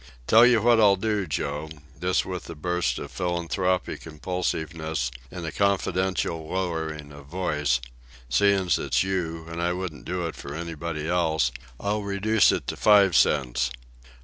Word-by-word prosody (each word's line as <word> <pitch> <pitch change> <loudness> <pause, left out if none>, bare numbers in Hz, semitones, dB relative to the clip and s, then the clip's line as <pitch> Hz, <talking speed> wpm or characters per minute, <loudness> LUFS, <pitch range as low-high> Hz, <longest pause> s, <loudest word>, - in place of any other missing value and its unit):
Tell 115 - +7
you 115 -3 +4
what 120 -1 +5
I'll 100 -2 +6
do, 105 -1 -1
Joe," 75 +1 -3 0.3
this 90 +2 +1
with 90 -1 -6
a 85 - -6
burst 90 -5 -1
of - - -7
philanthropic 90 +1 -1
impulsiveness 80 -4 -3 0.2
and 90 +1 -7
a 80 - -3
confidential 95 -4 0
lowering 80 -5 -3
of 70 -1 -12
voice, 75 -6 0 0.5
"seein's 95 +7 +3
it's - - +1
you, 85 -4 -2
and 85 +1 -5
I 85 +1 +1
wouldn't 90 -5 -6
do 90 0 -2
it 80 - -4
for 70 +1 -7
anybody 80 -1 -4
else, 80 -7 +1 0.3
I'll 105 +1 -1
reduce 100 +1 +3
it - - -2
to - - -3
five 100 -4 +5
cents. 65 -1 +2
85 Hz, 150 wpm, -25 LUFS, 80-95 Hz, 0.5 s, Tell